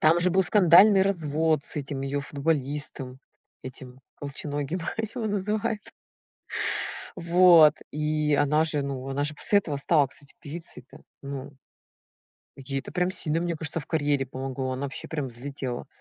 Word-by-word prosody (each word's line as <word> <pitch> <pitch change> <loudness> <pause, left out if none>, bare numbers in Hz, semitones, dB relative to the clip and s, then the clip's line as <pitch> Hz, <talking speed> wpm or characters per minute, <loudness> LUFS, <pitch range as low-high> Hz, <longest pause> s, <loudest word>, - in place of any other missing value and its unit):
Там 160 +2 +4
же 180 +1 +3
был 190 +2 +3
скандальный 195 +1 +6
развод, 160 -5 +1
с - - -4
этим 140 -1 -3
её 140 +1 -2
футболистом. 140 -3 -2 0.4
Этим, 130 0 -10 0.2
"Колченогим" 145 +3 -4 0.3
его 235 -4 -2
называют. 210 +1 -1 1.4
Вот, 170 -3 +6 0.2
и 150 0 0
она 150 +2 +3
же, 150 -3 +1
ну, 135 -1 -4
она 140 +1 -1
же 150 - -1
после 205 +7 +2
этого 155 -7 -3
стала, 145 +1 +3
кстати, 140 +1 -11
певицей 160 -3 -7
то, - - -14 0.2
ну. 140 0 -6 1.0
Ей 135 0 -4
это - - -10
прям 180 0 +1
сильно, 160 -3 +1
мне 170 -1 -1
кажется, 160 +1 -3
в 145 - -10
карьере 145 -4 +1
помогло. 130 0 -4
Она 130 - -4
вообще 135 - -5
прям 150 -4 -3
взлетела. 125 0 -6
150 Hz, 150 wpm, -26 LUFS, 140-170 Hz, 1.4 s, скандальный